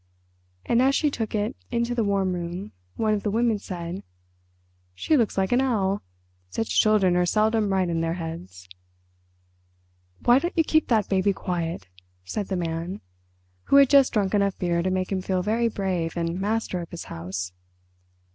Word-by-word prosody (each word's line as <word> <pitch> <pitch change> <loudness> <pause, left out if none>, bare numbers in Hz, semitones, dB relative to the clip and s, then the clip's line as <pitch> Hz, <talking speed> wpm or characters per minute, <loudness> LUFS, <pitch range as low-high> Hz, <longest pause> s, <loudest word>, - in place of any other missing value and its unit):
And 235 +1 +3
as 270 +1 +3
she 300 -2 +2
took 225 -4 -3
it 215 +4 -1
into 235 0 0
the 235 -2 +1
warm 195 -2 +1
room 175 +3 -5 0.2
one 215 -1 +1
of 205 - 0
the 210 - -1
women 225 0 +1
said, 175 -2 -6 0.9
"She 310 - +1
looks 230 -8 +1
like 190 -1 +1
an 245 +2 +4
owl. 205 -7 0 0.5
Such 225 - +1
children 205 -4 +3
are 180 0 +2
seldom 215 0 +2
right 190 -1 +2
in 165 -1 -1
their 165 0 -1
heads." 95 - -7 1.6
"Why 240 +2 +6
don't 345 +4 -4
you 325 - +5
keep 315 0 +2
that 220 -5 +2
baby 195 +1 +2
quiet?" 170 - -3 0.4
said 200 - -3
the 190 - -2
Man, 170 +2 -3 0.6
who - - +3
had 280 -2 +7
just 275 -2 +6
drunk 200 -2 +1
enough 200 -2 +1
beer 170 -1 0
to 185 - 0
make 185 0 -1
him 190 -1 0
feel 185 -1 -1
very 225 +4 +1
brave 185 -6 -2
and 170 +2 -2
master 210 -3 -1
of 170 - -8
his 170 - -7
house. 90 +2 -5
195 Hz, 175 wpm, -25 LUFS, 175-225 Hz, 1.6 s, had